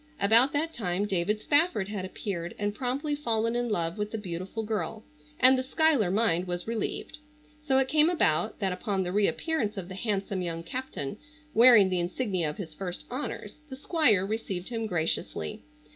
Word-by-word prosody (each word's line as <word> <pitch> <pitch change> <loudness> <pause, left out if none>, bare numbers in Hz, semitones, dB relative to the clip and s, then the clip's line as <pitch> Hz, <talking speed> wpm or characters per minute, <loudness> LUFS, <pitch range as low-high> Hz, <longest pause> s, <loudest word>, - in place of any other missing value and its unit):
About 230 +7 +5
that 320 +3 -1
time 190 -2 -1
David 195 +2 0
Spafford 290 - +2
had 200 -3 -4
appeared 175 -3 -5
and 205 0 -1
promptly 265 +6 -2
fallen 230 -5 0
in 240 0 0
love 170 -2 -1
with 210 0 -1
the 225 - -4
beautiful 190 +2 -5
girl, 215 0 -3 0.4
and 255 +1 +7
the 255 - 0
Schuyler 275 - +2
mind 185 -3 +1
was 175 0 -3
relieved. 230 +6 -3 0.4
So 275 -3 +2
it 265 0 +3
came 305 +3 +4
about 215 - +1
that, 190 -3 -1
upon 190 0 -1
the 180 - -3
reappearance 210 - 0
of 185 -1 -5
the - - -6
handsome 195 -1 -2
young 165 -1 -3
captain 210 - -5 0.4
wearing 230 -4 +7
the 180 - +1
insignia 180 -2 -1
of 150 - -7
his 165 -6 -6
first 180 +2 -5
honors, 270 +3 -5
the 265 - -6
Squire 270 - +3
received 200 -3 -4
him 225 -2 -3
graciously. 160 - -2
210 Hz, 175 wpm, -28 LUFS, 180-250 Hz, 0.4 s, and